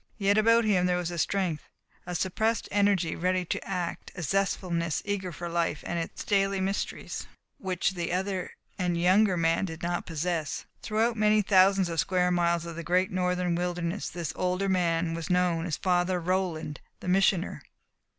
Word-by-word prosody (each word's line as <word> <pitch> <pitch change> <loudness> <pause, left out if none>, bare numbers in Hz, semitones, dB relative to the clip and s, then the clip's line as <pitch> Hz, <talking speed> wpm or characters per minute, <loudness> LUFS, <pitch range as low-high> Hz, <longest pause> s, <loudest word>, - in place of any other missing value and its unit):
Yet 200 -1 +3
about 230 +2 +4
him 185 -4 +3
there 180 0 +2
was 175 -1 -2
a 170 - -4
strength, 180 -4 -1 0.4
a 180 - -3
suppressed 220 +6 0
energy 200 -5 +2
ready 185 +1 0
to - - -3
act, 180 -3 -4
a 175 - -5
zestful 195 +2 0
eagerness 175 +3 -2
for 175 - -5
life 170 -3 -1
and 170 - -2
its 165 - -5
daily 195 -1 +1
mysteries 195 +1 -3 0.3
which 185 -1 0
the 175 -2 -3
other 190 0 -2 0.3
and 175 -2 0
younger 185 +2 +4
man 165 +3 +2
did 165 -2 -7
not 175 0 -2
possess. 165 -1 -2 0.2
Throughout 225 +2 0
many 215 0 +4
thousands 195 -1 +4
of 165 -1 -3
square 180 +1 +2
miles 170 -1 +1
of 170 -1 -6
the 170 - -4
great 180 +3 +1
northern 180 -1 0
wilderness 175 +1 -2
this 170 -4 -4
older 185 +2 0
man 170 -3 +1
was 165 -1 -5
known 180 -2 +1
as 155 - -2
Father 180 0 +1
Roland, 165 -4 -2 0.2
the - - -9
Missioner. 190 0 +2
180 Hz, 170 wpm, -28 LUFS, 170-195 Hz, 0.4 s, about